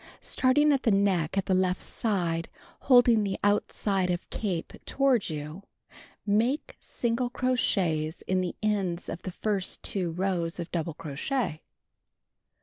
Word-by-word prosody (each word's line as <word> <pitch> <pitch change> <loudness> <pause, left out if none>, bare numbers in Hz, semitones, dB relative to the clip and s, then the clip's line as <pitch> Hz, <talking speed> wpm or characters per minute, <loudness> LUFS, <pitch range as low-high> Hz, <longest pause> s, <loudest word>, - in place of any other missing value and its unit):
Starting 295 +3 +3
at 270 - +1
the - - +2
neck 195 -4 +2
at 195 - +1
the 190 - +1
left 185 0 +1
side, 175 -7 -1 0.3
holding 245 -4 +5
the 195 -1 -2
outside 200 -2 +1
of 175 0 -2
capo 185 -6 -3
toward 270 -8 +2
you, 150 +3 -6 0.6
make 230 +8 +1
single 240 +1 -1
crochets 185 -12 0
in 185 0 0
the 180 -2 -3
ends 195 -5 0
of 170 - -5
the - - -5
first 195 0 -2
2 185 -4 0
rows 180 -2 -1
of 170 0 -5
doul)le 165 -2 -3
crochet. 155 - -2
195 Hz, 140 wpm, -28 LUFS, 170-230 Hz, 0.6 s, holding